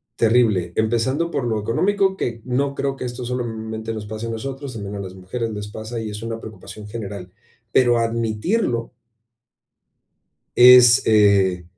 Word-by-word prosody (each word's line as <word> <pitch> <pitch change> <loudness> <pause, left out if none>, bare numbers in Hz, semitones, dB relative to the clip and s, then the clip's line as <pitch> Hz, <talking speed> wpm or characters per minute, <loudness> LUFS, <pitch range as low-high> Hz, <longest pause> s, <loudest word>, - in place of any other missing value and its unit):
terrible. 110 -7 +2
Empezando 130 +9 0
por 135 - -2
lo 110 -2 -1
económico, 190 - +1
que 115 -7 -3
no 135 +2 -1
creo 135 -1 -2
que 130 - -6
esto 120 0 -6
solamente 110 -2 -4
nos 105 -1 -6
pase 110 +2 -6
a - - -4
nosotros, 135 +4 -6
sino 105 -2 -6
a - - -5
las 95 -1 -7
mujeres 95 +6 -4
les 105 -1 -6
pasa, 110 +2 -6
y 110 -1 -5
es 105 +1 -7
una 115 0 -4
preocupación 105 -1 -10
general. 100 -4 -7 0.4
Pero 120 -2 +4
admitirlo 115 - -1 1.7
es, 125 -1 +8
eh 100 -4 +3
115 Hz, 155 wpm, -21 LUFS, 105-125 Hz, 1.7 s, es